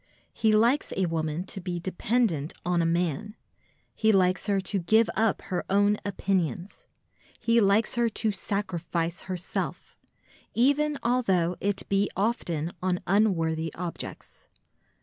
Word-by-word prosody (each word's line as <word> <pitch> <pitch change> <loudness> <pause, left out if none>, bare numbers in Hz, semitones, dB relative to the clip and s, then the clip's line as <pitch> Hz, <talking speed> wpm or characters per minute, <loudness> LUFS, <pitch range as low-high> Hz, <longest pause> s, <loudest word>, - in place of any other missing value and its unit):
He 220 - +2
likes 235 +7 +3
a 190 - +2
woman 160 0 -2
to 195 0 -6
be 175 0 -3
dependent 185 - 0
on 175 -1 +2
a 165 - +1
man; 175 +5 -1 0.6
he 220 0 +3
likes 185 0 +2
her 200 -1 +2
to 195 +1 -1
give 220 +6 +3
up 220 -2 +1
her 180 - -3
own 205 +1 +3
opinions; 190 - -2 0.5
he 230 0 +3
likes 200 +2 +3
her 235 -1 +2
to 220 0 -1
sacrifice 175 -4 -2
herself, 180 -1 -4 0.6
even 285 +4 +3
although 190 -8 +2
it 200 0 -2
be 200 0 +1
often 175 -7 -1
on 180 -1 0
unworthy 165 -6 +1
objects. 175 -1 -7
195 Hz, 130 wpm, -27 LUFS, 175-220 Hz, 0.6 s, likes